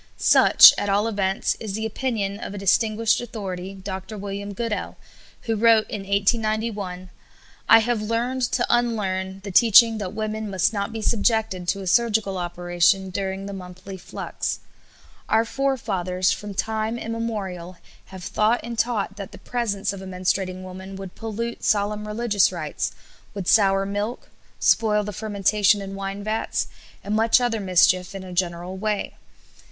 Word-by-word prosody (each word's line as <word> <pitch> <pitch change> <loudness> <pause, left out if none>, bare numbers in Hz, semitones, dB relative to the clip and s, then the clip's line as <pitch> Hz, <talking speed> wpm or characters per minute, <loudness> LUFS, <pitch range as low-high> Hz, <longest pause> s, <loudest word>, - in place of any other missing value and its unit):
Such, - - +8
at 205 - -2
all 205 +3 +2
events, 195 -3 0
is 215 -3 -5
the 220 +1 -3
opinion 215 -4 -2
of 205 - -6
a - - -6
distinguished 215 +3 +2
authority, 195 -5 -6
Dr. 190 +2 -7
William 200 0 -5
Goodell, 220 +1 -4 0.4
who 225 -2 -1
wrote 225 0 +4
in 210 - -3
1891: 200 -2 -1 0.6
"I 225 - +10
have 225 0 0
learned 235 +4 -1
to 240 - +2
unlearn 195 -5 -1
the 200 - -6
teaching 225 +2 +6
that 190 -2 -4
women 215 0 -3
must 190 +2 +1
not 200 +1 -2
be 220 -1 -5
subjected 220 -5 +1
to 195 +1 -1
a - - -7
surgical 210 -1 +1
operation 175 +2 +1
during 190 +1 -3
the 200 - -6
monthly 185 +1 -9
flux. 185 - -5 0.7
Our 225 +1 +3
forefathers, 195 -9 -1
from 200 +2 -5
time 220 +4 -1
immemorial, 205 -7 -5 0.3
have 190 -2 -11
thought 215 +6 +1
and 235 0 -5
taught 225 -4 -1
that 200 -2 -7
the - - -11
presence 215 -5 -2
of 195 - -8
a 190 - -8
menstruating 185 0 -2
woman 190 +1 -9
would 195 -1 -8
pollute 230 +1 -5
solemn 210 0 0
religious 210 -3 +2
rites, 165 -4 -3 0.4
would 195 -3 -5
sour 195 -2 +4
milk, 205 +4 -4 0.3
spoil 210 -2 +3
the 210 0 -5
fermentation 205 0 +2
in 195 -1 -6
wine 195 +1 -5
vats, 215 +1 -1 0.4
and 205 +1 -2
much 225 +3 +4
other 240 -3 0
mischief 185 0 +3
in 195 - -6
a 185 -1 -9
general 175 0 -2
way. 210 +1 -2
205 Hz, 155 wpm, -23 LUFS, 190-220 Hz, 0.7 s, I